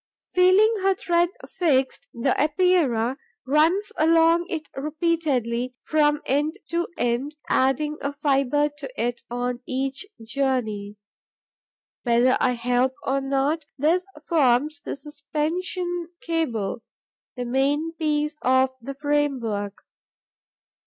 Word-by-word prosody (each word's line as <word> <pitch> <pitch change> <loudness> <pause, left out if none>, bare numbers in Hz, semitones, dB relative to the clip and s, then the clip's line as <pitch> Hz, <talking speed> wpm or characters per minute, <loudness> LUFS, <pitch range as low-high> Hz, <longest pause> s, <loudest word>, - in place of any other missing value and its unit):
Feeling 375 +5 +5
her 385 0 +3
thread 345 -1 +2 0.2
fixed, 280 -4 0
the 235 - 0
Epeira 295 -7 +2 0.3
runs 330 +9 +2
along 330 +2 +4
it 320 -5 -4
repeatedly, 275 -5 -1
from 295 -1 +2
end 295 +4 +1
to 340 +1 0
end, 245 +5 -1
adding 295 +3 +1
a 280 - -1
fibre 285 0 +1
to 275 -2 -6
it 240 +1 -1
on 245 0 -2
each 270 +7 -3 0.2
journey. 225 -5 -1 1.1
Whether 240 +1 +3
I 250 - +2
help 245 +2 +1
or 275 +1 0
not, 275 +3 0
this 335 +7 +2 0.2
forms 290 -1 +2
the - - -5
'suspension 330 +5 -3
cable,' 245 -11 -2 0.6
the 245 - -3
main 280 +6 +1
piece 300 -2 -1
of 260 +1 +3
the 275 +3 -6
framework. 265 -9 -1
290 Hz, 110 wpm, -24 LUFS, 255-325 Hz, 1.1 s, Feeling